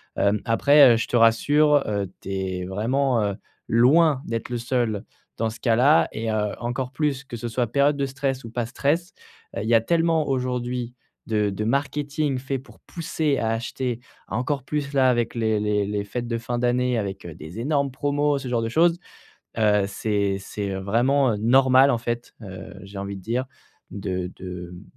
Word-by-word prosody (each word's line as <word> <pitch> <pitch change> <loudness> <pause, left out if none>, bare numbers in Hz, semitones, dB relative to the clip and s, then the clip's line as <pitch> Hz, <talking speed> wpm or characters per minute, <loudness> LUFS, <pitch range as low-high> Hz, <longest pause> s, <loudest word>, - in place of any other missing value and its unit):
Hem, 100 +1 +1
après, 135 +3 +6
heu, - - +2
je 115 - -2
te - - -2
rassure, 145 +6 +4
heu, 100 -2 -1 0.2
tu - - -8
es 95 -1 -3
vraiment, 115 +5 0
heu, 100 -1 -1 0.3
loin 135 +5 +4
d'être 115 +1 -4
le 120 -1 -2
seul 120 -4 -1 0.3
dans 115 0 0
ce 110 - -10
cas-là 125 +6 +4
et 110 0 -3
heu, 105 -1 0
encore 125 +2 -3
plus 140 -2 -1
que 120 -3 -8
ce 120 - -5
soit 120 +1 0
période 140 +4 +2
de 140 - 0
stress 135 -1 -3
ou 115 - -9
pas 120 -1 -2
stress. 160 +8 -1 0.4
Heu, - - -1
il - - -4
y 120 - +3
a 115 - +6
tellement 165 +2 +1
aujourd'hui 125 -2 -2 0.3
de 105 -2 +1
de 100 +2 -3
marketing 145 +2 -1
fait 130 +1 -3
pour 135 - -17
pousser 155 -4 -2
à 110 - 0
acheter. 120 +1 -2 0.3
Encore 125 +6 -2
plus 145 0 -3
là 130 -2 +4
avec 120 -2 0
les 110 -2 +1
les 105 -1 +1
les 105 -1 -2
fêtes 120 +4 -5
de 115 -1 -1
fin 120 +1 -3
d'année, 125 0 +1
avec, 95 -2 -5
heu, 85 - -7
des 80 +8 -9
énormes 140 +2 0
promos, 145 +1 0
ce 135 - -6
genre 120 -2 0
de 115 - -2
choses. 170 +6 +3 0.6
Heu, 105 -2 +3
c'est 100 -1 -1
c'est, 100 +1 -5
heu, 95 - -3
vraiment, 125 +6 +2
heu, 105 - -2
normal 130 +4 +5
en - - +1
fait, 120 0 -4
heu, 95 -3 -9
j'ai 100 +1 -10
envie 100 0 -5
de 95 - -11
dire, 120 +6 -2 0.5
de 95 -2 -4
de, 90 -1 -7
hem, 90 +2 -11
120 Hz, 195 wpm, -24 LUFS, 105-135 Hz, 0.6 s, après